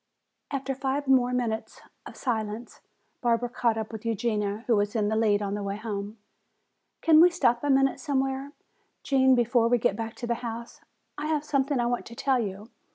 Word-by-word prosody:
After 275 -1 -2
five 270 +1 -2
minutes 250 -3 +1
more - - -21 0.2
of - - -11
silence 225 -2 -3 0.4
Barbara 240 0 +1
caught 235 -2 0
up 220 0 -4
with 220 -2 -7
Eugenia, 215 -2 -1
who 235 - +3
was 205 +2 0
in 210 -2 +1
the 220 - 0
lead 210 -2 +2
on 200 0 -2
the 205 - -3
way 200 0 -3
home. 210 -1 -5 0.9
"Can 320 -1 +7
we 355 - +8
stop 245 -9 +1
a 290 - 0
minute 270 0 +3
somewhere, 270 -1 -2 0.5
Gene, 265 -1 +4
before 240 -1 +3
we 245 +1 +3
get 230 -4 +1
back 225 +1 -5
to 240 - -6
the 235 - 0
house? 235 0 -7 0.4
I 300 - -3
have 305 -1 0
something 275 -2 0
I 240 - +1
want 240 0 -2
to 235 - -10
tell 265 +1 +1
you. 205 0 -5
240 Hz, 195 wpm, -27 LUFS, 220-270 Hz, 0.9 s, we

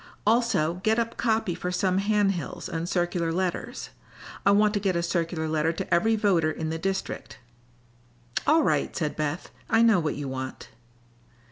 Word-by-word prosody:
Also 205 -7 +2
get 220 +1 +3
up 230 0 -1
copy 220 -5 0
for 180 +2 -4
some 185 +1 +1
hand 205 0 +2
hills 175 -4 -5
and 165 +1 -3
circular 175 -2 0
letters. 180 +1 -3 0.6
I - - +8
want 210 +1 +4
to 205 - +1
get 190 -2 0
a 170 - 0
circular 170 -2 -1
letter 155 +1 +1
to 170 - -3
every 220 +6 +3
voter 190 -7 +2
in 160 0 -3
the 160 - -3
district." 195 +2 -3 1.1
"All 315 +1 +5
right," - - 0
said 155 -4 -2
Beth. 155 +3 -3 0.2
"I 225 - +4
know 225 -5 +5
what 155 -3 -1
you 145 -1 -5
want." 130 0 -6
180 Hz, 170 wpm, -26 LUFS, 165-210 Hz, 1.1 s, I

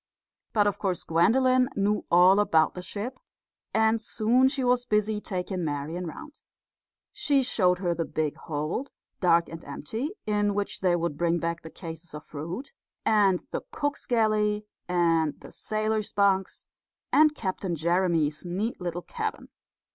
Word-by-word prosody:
But 210 -2 +3
of 205 -1 0
course 185 -3 -1
Gwendolen 255 +9 +3
knew 205 +1 +1
all 180 +3 +6
about 160 -6 +3
the 180 - -6
ship, 210 +7 -5 0.5
and 220 0 +2
soon 240 +3 +3
she 270 -1 -2
was 245 0 +3
busy 210 -2 0
taking 185 -2 -3
Marian 155 +4 -3
round. 300 - -10 0.7
She 290 -10 +2
showed 180 -7 +2
her 180 -2 0
the 170 - -1
big 155 -2 -2
hold, 155 - -3 0.3
dark 170 -2 +4
and 165 0 -9
empty, 220 - -4 0.2
in 205 -1 +1
which 205 0 -2
they 180 -2 +3
would 170 -4 -2
bring 170 0 +2
back 170 0 -2
the 160 - -9
cases 165 -1 -9
of 150 - -8
fruit, 170 - -6 0.3
and 200 -4 +3
the - - -2
cook's 290 -1 -3
galley, 215 -3 +2 0.2
and 165 -4 +2
the - - -12
sailors' 215 0 -2
bunks, 195 -1 +1 0.5
and 305 0 +5
Captain 190 - -3
Jeremy's 165 -2 +1
neat 190 +5 -3
little 175 0 -3
cabin. 445 -2 -5
190 Hz, 150 wpm, -27 LUFS, 170-220 Hz, 0.7 s, all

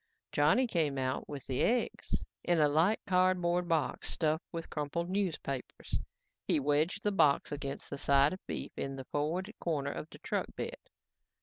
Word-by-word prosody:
Johnny 155 - +4
came 160 - 0
out 130 0 -1
with 140 -3 -6
the 130 -1 -1
eggs 245 +1 0 0.2
in 175 -2 +2
a 150 - +6
light 160 +9 +3
cardboard 180 -2 +2
box 160 -6 0
stuffed 160 0 0
with 165 -1 -5
crumpled 165 +4 -2
newspapers. 165 -9 -2 0.5
He - - +3
wedged 150 +7 +1
the 210 - +2
box 150 -8 +3
against 140 -1 -4
the 140 - -4
side 140 +2 +4
of 185 - -6
beef - - -4
in 135 0 -3
the 135 -1 -7
forward 170 +8 -1
corner 145 -4 -1
of 155 - -6
the - - -12
truck - - -2
bed. - - -4
155 Hz, 170 wpm, -32 LUFS, 140-180 Hz, 0.5 s, a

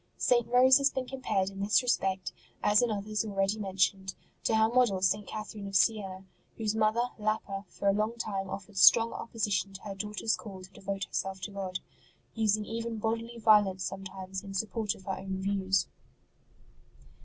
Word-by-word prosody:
St. 240 -2 +2
Rose 255 +3 +6
has 280 0 +4
been 260 -2 -4
com 270 0 -7
pared 195 -5 0
in 195 - -10
this 205 +5 +3
respect, 190 -6 0 0.3
as 210 0 +5
in 245 - +2
others 215 0 -2
already 200 0 -1
men 195 -2 -5
tioned, 190 +1 +1 0.3
to 225 - +2
her 220 0 +5
model 235 -5 +3
St. 205 +1 +1
Catherine 215 -1 -6
of 195 - -6
Siena, 190 -2 +1 0.3
whose 215 -2 -1
mother, 220 +3 +1
Lapa, 210 -2 -2
for 200 - -4
a 195 - +5
long 215 +3 -1
time 195 -4 -3
offered 195 +1 -7
strong 230 +3 +7
opposition 205 -3 -2
to 195 - -9
her 205 - -5
daughter 210 +2 -6
s 220 - +3
call 190 -4 -10
to 185 - -13
devote 195 0 -4
herself 190 +1 -3
to 205 - -5
God, 190 -2 -4 0.5
using 215 -1 +1
even 230 0 -4
bodily 230 +2 -3
violence 210 -4 +4
sometimes 190 0 -6
in 195 -1 -8
support 215 +1 -1
of 190 - -16
her 190 0 -4
own 190 0 -4
views. 195 0 +1
205 Hz, 185 wpm, -30 LUFS, 195-225 Hz, 0.5 s, strong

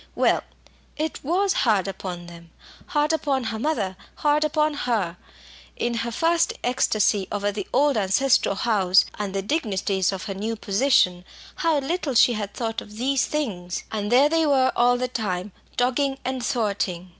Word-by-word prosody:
Well, - - +2 0.6
it 310 +1 -3
was 375 +7 +1
hard 205 -6 +2
upon 180 -2 -6
them! 170 -1 -13 0.4
hard 300 -2 +1
upon 280 -5 0
her 225 -1 -3
mother 220 -9 -1 0.2
hard 300 0 +2
upon 305 0 +1
her. 215 -11 -1 0.6
In 240 - -1
her 235 0 -2
first 330 +6 +2
ecstasy 215 -5 +1
over 205 0 -1
the 200 -1 -5
old 280 0 +3
ancestral 205 +2 +2
house 195 -3 +3
and 200 -2 -3
the 195 - -1
dignities 200 - 0
of 190 -1 -5
her 200 - -4
new 215 +4 -3
position, 200 -4 +2 0.3
how 330 -3 +2
little 285 -1 -2
she 240 +1 +6
had 210 -2 -5
thought 225 -2 -3
of 210 0 -12
these 270 +3 +1
things! 190 -13 -3
And 210 0 -3
there 265 +4 +6
they 325 0 +2
were 260 -2 +3
all 245 +1 +4
the 255 +1 -1
time 205 -5 -3 0.3
dogging 270 +2 +1
and 260 -1 -2
thwarting. 200 -8 -1
235 Hz, 165 wpm, -24 LUFS, 195-280 Hz, 0.6 s, she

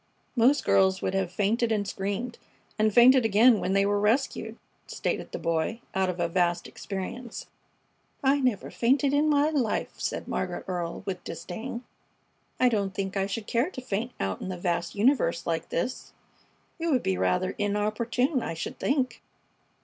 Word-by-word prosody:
"Most 260 +5 +4
girls 190 -1 +3
would - - 0
have 190 -2 0
fainted 220 +5 +1
and 205 -2 0
screamed, 205 +6 -3 0.4
and 215 0 +4
fainted 250 +3 +7
again 225 +1 +5
when 190 - -1
they 195 0 +3
were 205 0 +1
rescued," 225 +7 0 0.3
stated - - -3
the - - -4
Boy, 165 +7 -1
out 190 -1 +1
of 180 -1 -4
a 170 - +1
vast 175 0 +1
experience. 215 +5 -6 0.8
"I 275 +1 +4
never 250 -7 0
fainted 270 +4 +2
in 295 +2 +3
my 295 +1 +3
life," 260 -8 0
said - - -3
Margaret - - -3
Earle, 175 -2 -3
with 185 -2 -4
disdain. 220 +9 -6 0.8
"I 255 - +5
don't 200 -5 0
think 195 0 -3
I 195 0 +1
should 210 +2 -4
care 240 - +1
to 315 - -8
faint 240 -1 -3
out 95 -1 -2
in - - -4
the 185 - -4
vast 175 -1 -2
universe 275 - +2
like - - -2
this. - - -3 0.7
It 335 - -2
would 270 -6 +2
be 95 - +1
rather 95 - +1
inopportune, 215 +6 0
I 165 - -4
should 165 - -5
think." 255 -5 0
210 Hz, 170 wpm, -27 LUFS, 190-250 Hz, 0.8 s, fainted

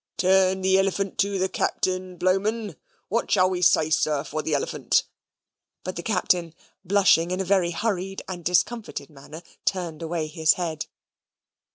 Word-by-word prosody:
"Turn 190 0 +3
the 190 0 +3
elephant 195 0 -1
to 200 0 +1
the 190 0 +1
Captain, 185 -1 -2
Blowman. 195 +2 0 0.3
What 230 +4 -1
shall 185 -2 +3
we 180 -1 -2
say, 160 -3 +4
sir, 150 -2 +1
for 155 +1 -4
the 155 -1 -1
elephant?" 140 - 0 0.8
but 185 - -5
the 170 - -4
Captain, 175 -4 0 0.3
blushing 190 -3 +3
in 185 +1 -2
a 190 - -1
very 185 -2 +2
hurried 195 0 -3
and 180 -2 -6
discomfited 180 -3 -1
manner, 150 +4 -12 0.2
turned 170 -4 -2
away 165 -1 -2
his 160 0 +2
head. 165 -4 -4
185 Hz, 155 wpm, -25 LUFS, 165-190 Hz, 0.8 s, say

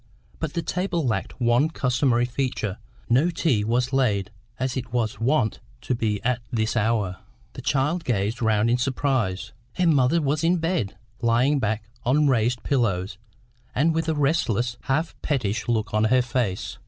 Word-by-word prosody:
But 160 -3 -3
the 170 - -1
table 180 -3 -1
lacked 110 +2 -2
one 120 +5 +3
customary 125 -4 +1
feature; 120 -5 -2 0.3
no 130 +9 +3
tea 160 -10 +1
was 125 +4 0
laid 105 -7 +1 0.3
as 130 0 -1
it 125 -2 -4
was 115 -3 -1
wont 120 -1 +1 0.2
to - - -1
be 110 -3 0
at 125 0 0
this 110 0 -1
hour. 110 -5 +1 0.4
The - - -8
child 150 +5 0
gazed 110 -2 -1
round 110 0 +2
in 125 - +2
surprise. 120 -7 -1 0.2
Her 180 - 0
mother 145 -1 +4
was 150 +1 0
in 175 +2 +3
bed, 165 - -1 0.2
lying 120 +5 +3
back 110 -2 -2 0.2
on 145 +5 +3
raised 120 -2 +1
pillows, 100 -7 0 0.6
and 160 +5 +3
with 165 0 -1
a 160 - +1
restless, 125 -6 +1
half 155 +5 0
pettish 115 -7 -1
look 110 -3 0
on 105 0 +3
her 125 +3 +4
face. 120 -6 -2
125 Hz, 165 wpm, -24 LUFS, 110-145 Hz, 0.6 s, mother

